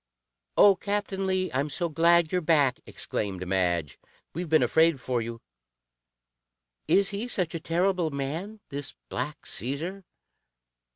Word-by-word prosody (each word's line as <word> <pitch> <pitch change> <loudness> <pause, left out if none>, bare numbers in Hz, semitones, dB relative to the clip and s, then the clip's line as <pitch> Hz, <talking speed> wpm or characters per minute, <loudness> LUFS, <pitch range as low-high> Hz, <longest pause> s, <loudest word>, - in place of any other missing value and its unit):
"Oh, 200 -1 +7
Captain 200 -1 -2
Lee, 185 0 0
I'm 140 +3 0
so 170 +4 0
glad 170 +1 +3
you're 180 - +1
back!" 145 -6 +3
exclaimed 95 -3 -4
Madge. 85 -6 0 0.3
"We've 175 +1 -4
been 155 0 +4
afraid 160 -3 +3
for 125 -1 -1
you. 115 0 -6 1.5
Is 195 +1 +3
he 205 +4 -3
such 180 -8 -1
a 165 - -3
terrible 175 +1 +1
man, 160 +10 -4
this 140 -1 -4
Black 140 +4 -4
Caesar?" 155 - -2
160 Hz, 130 wpm, -27 LUFS, 130-185 Hz, 1.5 s, Oh